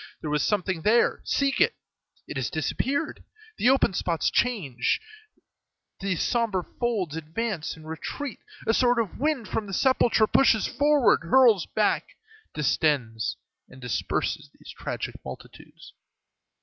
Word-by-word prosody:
There 150 Hz, -, -4 dB
was 150 Hz, -1 st, +1 dB
something 190 Hz, -4 st, 0 dB
there; 225 Hz, +6 st, +3 dB
seek 275 Hz, -1 st, +1 dB
it. 465 Hz, -, +4 dB, 0.5 s
It -, -, -7 dB
has 130 Hz, -5 st, -1 dB
disappeared; 265 Hz, -, -2 dB, 0.4 s
the 245 Hz, -, +4 dB
open 265 Hz, -7 st, +3 dB
spots 170 Hz, -3 st, 0 dB
change 185 Hz, -, 0 dB, 1.0 s
place, 195 Hz, -2 st, -1 dB
the -, -, -5 dB
sombre 225 Hz, -6 st, 0 dB, 0.2 s
folds 210 Hz, -, -1 dB
advance 165 Hz, +3 st, -3 dB
and 155 Hz, -1 st, -13 dB
retreat, 230 Hz, -, -5 dB, 0.3 s
a 225 Hz, -, +2 dB
sort 245 Hz, 0 st, +3 dB
of 225 Hz, -5 st, -2 dB
wind 285 Hz, -5 st, 0 dB
from 215 Hz, -2 st, -3 dB
the 195 Hz, -, -3 dB
sepulchre 245 Hz, -4 st, +3 dB
pushes 220 Hz, -1 st, +4 dB
forward, 290 Hz, -2 st, +3 dB
hurls 220 Hz, +1 st, +4 dB
back, 215 Hz, -1 st, 0 dB, 0.4 s
distends, 135 Hz, -7 st, 0 dB, 0.3 s
and 130 Hz, -, -14 dB
disperses 125 Hz, -2 st, -2 dB
these -, -, -12 dB
tragic -, -, -5 dB
multitudes. -, -, -11 dB
210 Hz, 135 wpm, -26 LUFS, 160-245 Hz, 1.0 s, it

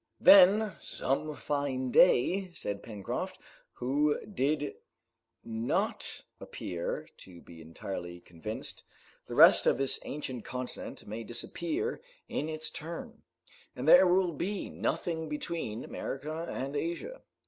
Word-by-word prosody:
"Then, 200 Hz, +2 st, +8 dB
some 150 Hz, +3 st, -2 dB
fine 135 Hz, -4 st, -2 dB
day," 185 Hz, +12 st, +4 dB
said 100 Hz, -1 st, -4 dB
Pencroft, 105 Hz, -4 st, -5 dB, 0.4 s
who 145 Hz, +4 st, +1 dB
did 150 Hz, -5 st, -1 dB, 0.7 s
not 115 Hz, +1 st, -2 dB
appear 85 Hz, -1 st, -4 dB
to 90 Hz, -2 st, -12 dB
be 85 Hz, -1 st, -13 dB
entirely 85 Hz, +2 st, -6 dB
convinced, 90 Hz, +6 st, -7 dB, 0.5 s
"the -, -, -5 dB
rest -, -, +8 dB
of -, -, +4 dB
this 135 Hz, 0 st, +2 dB
ancient 130 Hz, -5 st, -4 dB
continent 125 Hz, 0 st, -6 dB
may 110 Hz, +2 st, -5 dB
disappear 335 Hz, -, -3 dB, 0.3 s
in 155 Hz, -, -2 dB
its 155 Hz, 0 st, -3 dB
turn, 225 Hz, -, -7 dB, 0.5 s
and -, -, -4 dB
there 190 Hz, -8 st, +9 dB
will 180 Hz, 0 st, +3 dB
be 190 Hz, +7 st, -3 dB
nothing 160 Hz, -2 st, -2 dB
between 150 Hz, -7 st, -3 dB
America 155 Hz, +4 st, -5 dB
and 135 Hz, +3 st, -4 dB
Asia." 170 Hz, -, -3 dB
145 Hz, 115 wpm, -31 LUFS, 115-175 Hz, 0.7 s, there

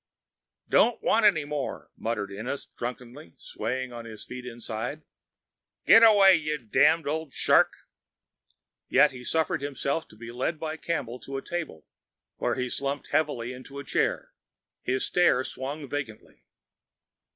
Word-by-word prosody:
"Don't 240 Hz, 0 st, +3 dB
want 220 Hz, -1 st, +4 dB
any 160 Hz, -8 st, +2 dB
more," 145 Hz, -2 st, -5 dB
muttered 105 Hz, -3 st, -3 dB
Ennis 120 Hz, +8 st, -5 dB
drunkenly, 120 Hz, -, -7 dB
swaying 130 Hz, 0 st, -4 dB
on 120 Hz, -1 st, -8 dB
his 110 Hz, -2 st, -9 dB
feet 125 Hz, 0 st, -8 dB
inside. 120 Hz, +5 st, -5 dB, 0.8 s
"Get 225 Hz, -, +8 dB
away, 200 Hz, -5 st, +8 dB
you 150 Hz, -1 st, -2 dB
damned 150 Hz, +6 st, +3 dB
old 155 Hz, -1 st, -3 dB
shark." -, -, +4 dB, 1.2 s
Yet -, -, +5 dB
he 125 Hz, -2 st, -10 dB
suffered 160 Hz, +1 st, 0 dB
himself 140 Hz, +2 st, -2 dB
to -, -, -17 dB
be 115 Hz, +2 st, -9 dB
led 130 Hz, +6 st, -2 dB
by 160 Hz, 0 st, -3 dB
Campbell 130 Hz, -8 st, -3 dB
to 135 Hz, +3 st, -6 dB
a 135 Hz, -, -6 dB
table, 165 Hz, -, -5 dB, 0.5 s
where -, -, 0 dB
he 125 Hz, -1 st, -2 dB
slumped 140 Hz, +3 st, -3 dB
heavily 125 Hz, -6 st, 0 dB
into 130 Hz, +2 st, -11 dB
a 140 Hz, -, -5 dB
chair. -, -, -1 dB, 0.5 s
His 130 Hz, +1 st, 0 dB
stare 175 Hz, -8 st, +3 dB
swung 140 Hz, +3 st, -5 dB
vacantly. 130 Hz, -6 st, -7 dB
135 Hz, 140 wpm, -27 LUFS, 120-155 Hz, 1.2 s, Get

